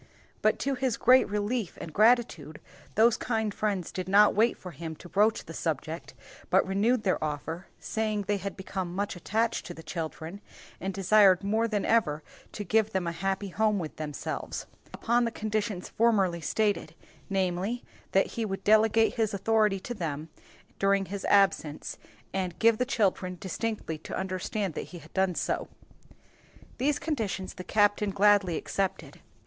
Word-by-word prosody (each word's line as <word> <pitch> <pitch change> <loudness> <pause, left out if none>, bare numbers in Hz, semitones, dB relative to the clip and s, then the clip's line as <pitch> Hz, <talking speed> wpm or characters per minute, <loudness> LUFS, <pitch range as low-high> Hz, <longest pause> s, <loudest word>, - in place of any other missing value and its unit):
But - - +3
to 275 - 0
his 255 -2 -1
great 255 -1 +5
relief 210 0 -2
and 160 - -7
gratitude, 215 - +2 0.4
those 225 +1 +5
kind 220 -3 -1
friends 200 -6 -2
did 185 0 -4
not 205 +2 +6
wait 225 +3 +3
for 180 - -9
him 160 +1 -6
to 175 - -12
broach 210 +5 +2
the - - -9
subject, - - -4 0.3
but - - +4
renewed 215 +5 +1
their 185 -5 +1
offer, 155 +4 -4
saying 215 -2 -2
they 205 +1 0
had 195 +1 -5
become 190 -2 -4
much 200 0 -2
attached 220 +6 -1
to 175 - -7
the 165 - -11
children, 165 +3 -5 0.4
and 195 - -2
desired 195 0 +5
more 220 +3 +1
than 210 -3 -1
ever 155 -10 +2 0.3
to 210 - -5
give 220 +2 +1
them 190 -2 0
a 170 - -1
happy 195 +3 -2
home 210 +2 +1
with 160 -5 -5
themselves; 150 -2 -4 0.3
upon 240 +1 +1
the 235 - +1
conditions 215 -4 -3
formerly 195 -7 +2
stated, 210 +4 0 0.3
namely, 190 +4 -1 0.3
that 195 - +4
he 230 - -4
would 195 -3 -4
delegate 220 +1 +4
his 220 -3 0
authority 210 0 +2
to 240 - -5
them 160 -6 -4 0.5
during 195 0 +3
his 195 +1 -5
absence, 195 -7 +2 0.3
and 185 -2 -2
give 230 -1 +4
the 250 - +2
children 195 -7 0
distinctly 195 -4 -3
to - - -6
understand 190 0 -2
that - - -5
he 180 - -9
had - - -15
done 190 -2 +1
so. - - -1 1.1
These 290 +2 +2
conditions 220 - -3
the 185 - -8
captain 205 +1 +2
gladly 200 -3 +3
accepted. 195 -1 -3
200 Hz, 165 wpm, -28 LUFS, 185-220 Hz, 1.1 s, not